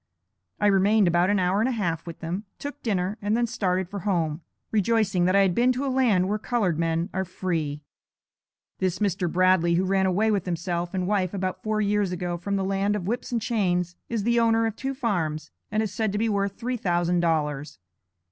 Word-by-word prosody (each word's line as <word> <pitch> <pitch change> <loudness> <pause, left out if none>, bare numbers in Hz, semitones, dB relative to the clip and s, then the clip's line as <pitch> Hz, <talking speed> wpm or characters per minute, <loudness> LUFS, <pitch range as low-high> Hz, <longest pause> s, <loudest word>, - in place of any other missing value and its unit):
I - - +1
remained 200 +1 +4
about 175 +2 +3
an 205 - +3
hour 185 +1 +1
and 230 +4 +2
a - - -1
half 170 -8 -2
with 165 - -8
them, 180 +6 -4
took 285 0 -7
dinner, 200 -1 -1
and 205 +2 +1
then 240 - +2
started 185 -4 -1
for 200 +2 -6
home, 170 -5 -1 0.3
rejoicing 210 -4 +2
that 185 +2 +3
I 200 - +6
had 190 -2 +3
been 245 +6 +3
to 260 +3 -2
a 265 - -1
land 220 -9 +3
where 210 +2 -1
colored 210 -9 0
men 165 +2 0
are 190 - 0
free. 165 -5 -3 1.0
This 185 -2 0
Mr. 185 -4 0
Bradley, 185 -2 +3
who 185 +2 +2
ran 190 0 +2
away 210 +4 +2
with 200 -4 -1
himself 175 +1 -2
and 185 -1 0
wife 195 -1 0
about 185 -1 -3
four 215 0 0
years 205 -2 +1
ago 175 -1 -2
from 200 +4 -3
the 195 -1 0
land 195 +1 0
of 195 -4 -3
whips 240 +6 -3
and 235 - +1
chains, 180 -6 0
is 230 -3 -1
the 235 +2 +2
owner 225 0 +3
of 225 -2 -2
two 270 +2 -4
farms, 160 - -2 0.2
and 215 +1 +1
is 210 -3 -4
said 215 +1 0
to - - -1
be 225 +2 +1
worth 200 -1 -1
three 245 +1 -2
thousand 175 -3 +1
dollars. 150 -5 -1
195 Hz, 215 wpm, -25 LUFS, 175-215 Hz, 1.0 s, I